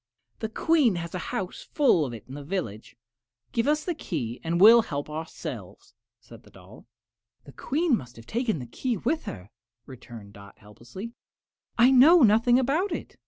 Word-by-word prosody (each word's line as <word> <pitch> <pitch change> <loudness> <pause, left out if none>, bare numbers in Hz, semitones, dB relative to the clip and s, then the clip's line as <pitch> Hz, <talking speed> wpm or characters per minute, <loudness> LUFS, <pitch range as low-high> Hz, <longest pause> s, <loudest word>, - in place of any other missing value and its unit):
"The 220 - -4
Queen 280 - +2
has 170 -1 -6
a 180 - -3
house 185 -1 -4
full 255 - +3
of 125 - -6
it 110 -1 -12
in 130 - -11
the 145 0 -8
village. 140 - -5 0.6
Give 230 +1 -1
us 300 +1 +1
the 355 - -1
key 120 - -5
and 170 +1 -1
we 195 - +7
will 235 - +6
help 145 -8 -5
ourselves," 160 +1 -8 0.3
said 115 0 -15
the - - -20
doll. 95 +4 -16 0.6
"The 140 - -14
Queen 290 - 0
must 125 - -8
have 115 - -14
taken 230 - -2
the 125 - -7
key 235 - -3
with 315 - -2
her," 90 +4 -9 0.3
returned 120 -5 -12
Dot, 100 0 -15
helplessly; 120 - -11 0.6
"I 245 +2 +6
know 290 +5 +7
nothing 230 +3 +4
about 295 +10 0
it." - - -6
180 Hz, 180 wpm, -26 LUFS, -, 0.6 s, we